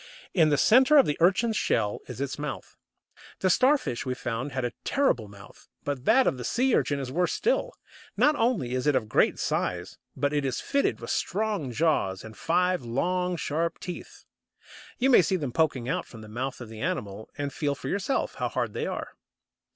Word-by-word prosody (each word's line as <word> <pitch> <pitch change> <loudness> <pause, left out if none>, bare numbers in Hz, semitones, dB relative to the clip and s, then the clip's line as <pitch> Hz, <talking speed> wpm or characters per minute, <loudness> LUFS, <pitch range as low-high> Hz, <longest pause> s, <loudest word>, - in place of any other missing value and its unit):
In 160 -5 +4
the 145 - +3
centre 260 - +6
of 275 - +7
the 150 - 0
Urchin's 200 +6 +3
shell 105 - 0
is - - -8
its 140 +1 -3
mouth. 150 -2 -6 0.7
The 185 - +3
Starfish, 255 - +2
we 130 -1 -2
found, 130 +3 -4
had 130 -2 -2
a 120 - -3
terrible 270 - +1
mouth, 100 -1 -15 0.2
but 140 -2 -4
that 255 +4 +5
of 130 - +1
the 240 - +1
Urchin 145 -1 +1
is 130 -2 -5
worse 180 +5 +1
still. - - 0 0.4
Not 300 +1 +4
only 225 - 0
is 130 +3 -1
it 145 - +4
of 120 -4 0
great - - +2
size, - - -2 0.2
but 145 +2 0
it 145 -1 +1
is 130 -2 -1
fitted 280 0 0
with - - -4
strong 205 - -1
jaws 120 - 0
and 110 0 -10
five 180 - +1
long, 180 +9 -1
sharp 165 +2 -1
teeth, 180 - -8 0.7
You 265 +2 +3
may 240 - +8
see 185 +2 0
them 145 -8 -2
poking 130 -4 0
out - - -2
from 115 - -12
the 110 - -10
mouth 125 +5 -4
of 120 - -8
the 110 -1 -9
animal, 110 - -3
and 145 -1 -3
feel 145 -2 -1
for - - -8
yourself 200 +7 -1
how - - -2
hard - - -2
they - - -2
are. - - -4
150 Hz, 195 wpm, -27 LUFS, 125-195 Hz, 0.7 s, may